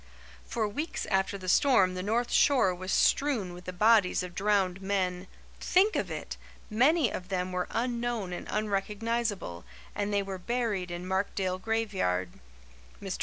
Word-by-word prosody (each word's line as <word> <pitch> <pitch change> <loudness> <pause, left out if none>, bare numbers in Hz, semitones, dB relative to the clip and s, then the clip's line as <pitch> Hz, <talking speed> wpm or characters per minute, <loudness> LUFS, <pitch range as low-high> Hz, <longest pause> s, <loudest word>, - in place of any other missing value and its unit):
For 220 -2 -1
weeks 295 +11 -4
after 190 +1 +1
the 185 -1 -9
storm 190 -4 +4
the 185 - -4
north 230 +5 0
shore 255 -10 +4
was 185 +1 -5
strewn 240 -11 +2
with 180 0 -11
the 185 - -4
bodies 205 0 +4
of 180 -1 -7
drowned 195 -2 +1
men. 185 -2 -1 0.3
Think 395 +4 +3
of - - -1
it! - - -6 0.3
Many 265 +4 +3
of 180 0 -6
them 185 -1 -2
were 180 0 -2
unknown 235 -5 -2
and - - -6
unrecognizable, 210 - -2 0.3
and 205 0 -2
they 200 -1 +1
were 195 -1 -6
buried 215 -3 -1
in 175 +1 -5
Markdale 190 -1 -1
graveyard. 190 - -1 0.7
Mr. - - -5
200 Hz, 155 wpm, -29 LUFS, 185-230 Hz, 0.7 s, storm